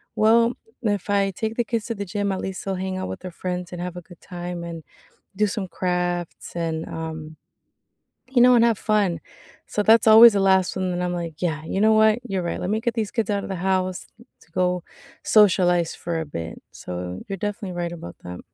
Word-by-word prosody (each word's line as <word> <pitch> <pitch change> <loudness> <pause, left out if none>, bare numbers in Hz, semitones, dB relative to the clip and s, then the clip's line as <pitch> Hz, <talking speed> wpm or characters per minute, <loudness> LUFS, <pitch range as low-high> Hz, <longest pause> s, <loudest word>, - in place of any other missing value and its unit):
"Well, 230 +2 +4 0.3
if 205 -2 -1
I 200 -1 +2
take 220 +4 -3
the 240 - +1
kids 230 -1 -2
to 230 - -3
the 200 -1 -4
gym, 200 +2 -2
at 190 - -3
least 190 -1 -5
they'll 195 - -1
hang 185 0 -3
out 185 - -3
with - - -6
their 185 -1 -7
friends, 180 0 -4
and 175 0 -6
have 180 0 -5
a - - -6
good 175 0 -16
time, 175 -1 -6
and 165 -1 -7 0.5
do 210 +1 +2
some 195 -1 -3
crafts 175 -1 -3
and, 160 -1 -2
um, 160 -1 -6 0.9
you 250 -2 +3
know, 250 0 +7
and 230 - +5
have 230 -3 +2
fun." 200 -6 +1 0.5
So, 210 - -1
that's 225 +2 +5
always 225 +2 +10
the 200 - +2
last 190 -1 +3
one 185 -1 -1
then 180 0 -2
I'm, 180 0 -1
like, 170 -2 -4
"Yeah, 155 -3 -1
you 190 +4 -2
know 220 +1 +5
what? 220 +1 +5
You're 190 -2 -1
right. 170 - -3
Let 180 - -2
me 220 +1 0
get 235 -1 -1
these 220 -3 -2
kids 225 -3 -1
out 200 -1 -1
of - - -6
the 190 - -2
house 185 -1 0
t 235 - -18 0.2
to - - -23
go 180 0 0 0.4
socialize 180 -5 +4
for 170 -1 -4
a 160 - -4
bit." 85 - -6
So, 90 +1 -6
you're 195 - -3
definitely 205 -2 -4
right 175 -1 -2
about 125 - -9
that. 90 0 -7
185 Hz, 225 wpm, -23 LUFS, 175-210 Hz, 0.9 s, always